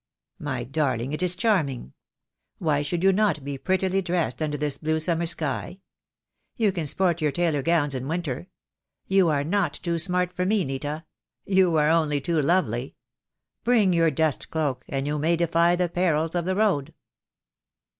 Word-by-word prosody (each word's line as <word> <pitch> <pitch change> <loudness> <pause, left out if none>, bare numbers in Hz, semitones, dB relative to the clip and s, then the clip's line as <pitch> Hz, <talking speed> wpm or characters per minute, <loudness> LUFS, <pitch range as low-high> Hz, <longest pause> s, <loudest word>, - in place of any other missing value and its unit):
"My 140 -7 -3
darling, 135 -1 -1
it 155 - -3
is 180 -1 +2
charming. 155 - 0 0.6
Why 150 -4 +1
should 170 +4 -2
you 195 0 +5
not 200 -7 +1
be 140 -1 -5
prettily 190 +2 0
dressed 175 -2 -1
under 150 -1 -1
this 150 -1 -1
blue 160 0 0
summer 170 +1 0
sky? 165 +3 -2 0.8
You 220 -4 +2
can 170 -5 -3
sport 175 +1 +1
your 150 -1 +2
tailor 165 -3 0
gowns 145 -1 +1
in 130 0 -4
winter. 165 -1 -3 0.6
You 190 -3 +3
are 145 -2 +1
not 175 -1 0
too 170 -1 -2
smart 180 +1 +1
for 180 - -2
me, 195 -1 +1
Nita. 145 +4 -4 0.4
You 190 -3 +3
are 150 -1 +3
only 155 -3 +2
too 160 +2 0
lovely. 135 -6 0 0.7
Bring 220 -6 +3
your 165 -1 +3
dust 155 0 0
cloak, 145 -6 -2
and 135 0 -2
you 150 +1 -1
may 165 +3 +2
defy 170 +1 +2
the 180 0 0
perils 165 -2 0
of 175 -1 -1
the 185 +1 0
road." 195 -10 0
165 Hz, 170 wpm, -25 LUFS, 145-180 Hz, 0.8 s, you